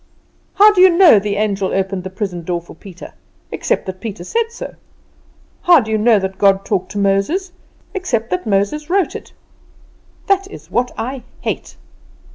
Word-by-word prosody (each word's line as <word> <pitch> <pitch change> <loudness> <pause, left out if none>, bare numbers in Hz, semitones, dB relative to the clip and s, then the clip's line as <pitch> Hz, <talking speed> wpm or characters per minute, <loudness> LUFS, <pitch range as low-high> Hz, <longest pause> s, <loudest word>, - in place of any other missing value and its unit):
How 420 +1 +7
do 370 - +3
you 375 - +8
know 340 - +6
the 200 0 -2
angel 200 -2 -1
opened 190 -1 -1
the 190 - -5
prison 185 -3 -5
door 175 +1 -2
for 170 - -14
Peter, 185 +1 -12 0.4
except - - -1
that 185 0 -6
Peter 210 -5 -6
said 455 - -1
so? 470 - -8 0.9
How 350 -3 +6
do 220 -3 -4
you 220 - +2
know 225 0 +4
that 190 -1 -4
God 195 -1 +3
talked 190 -3 -2
to - - -5
Moses, 200 - 0 0.4
except 300 - -2
that 180 +3 -2
Moses 215 +10 0
wrote 380 0 +1
it? - - -9 0.9
That 390 -1 +1
is - - -12
what 245 +1 +1
I 260 +2 -4 0.2
hate!" - - -4
210 Hz, 175 wpm, -17 LUFS, -, 0.9 s, you